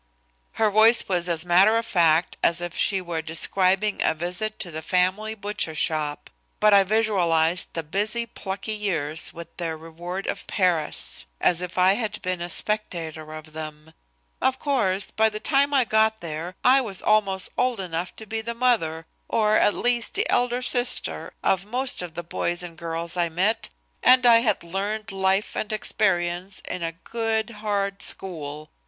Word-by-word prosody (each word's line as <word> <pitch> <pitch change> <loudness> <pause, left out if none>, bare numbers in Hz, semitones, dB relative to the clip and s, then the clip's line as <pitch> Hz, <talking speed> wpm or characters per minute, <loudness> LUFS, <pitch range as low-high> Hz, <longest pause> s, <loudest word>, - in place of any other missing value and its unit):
Her 220 -1 +1
voice 220 +3 +6
was 180 -2 0
as 165 0 +1
matter 190 +6 +5
of 230 - -1
fact 165 -3 +2
as 170 0 +2
if 175 -1 -5
she 195 -2 +1
were 170 -2 -3
describing 190 +5 +2
a - - +2
visit 180 +6 -2
to 180 -5 -4
the 160 0 -5
family 185 +6 +1
butcher 205 -6 -3
shop. 150 -2 -2 0.3
But 210 -1 +5
I 200 -1 +7
visualized 180 -5 +1
the 165 - -2
busy, 210 +8 -1
plucky 200 -2 -5
years 165 -8 -1
with 170 0 -11
their 165 -2 -3
reward 175 +4 -7
of - - -4
Paris 170 - -1
as 175 -1 +2
if 180 0 -6
I 185 +1 +5
had 220 0 -2
been 185 -1 -2
a 175 - -4
spectator 165 -7 0
of 155 0 -10
them. 155 0 -8 0.5
"Of 260 0 +2
course, 210 -10 0
by 220 0 +3
the 215 0 -5
time 280 +5 +2
I 270 -3 +4
got 220 0 +2
there 170 +2 -6
I 260 +2 +6
was 200 -7 -3
almost 195 -3 +1
old 250 -3 0
enough 175 -1 -4
to 220 - -8
be 220 +1 -3
the 235 +1 -4
mother, 190 -10 +1 0.2
or, 215 -1 +2
at 205 - +3
least, 240 -1 0
the - - +2
elder 245 +1 +1
sister 245 0 0
of 195 +1 +1
most 250 +1 -1
of 175 -2 -7
the 175 - -5
boys 175 +1 -2
and 170 -2 -9
girls 165 +1 -4
I 170 -1 +1
met, 215 +6 0 0.3
and 255 0 +5
I 235 -1 +7
had 220 -6 0
learned 205 +5 -4
life 195 +1 0
and 215 - -3
experience 185 -3 0
in 180 - -5
a 165 0 -2
good, 225 -1 -1
hard 200 -2 -2
school. 155 -7 -5
190 Hz, 175 wpm, -24 LUFS, 170-220 Hz, 0.5 s, I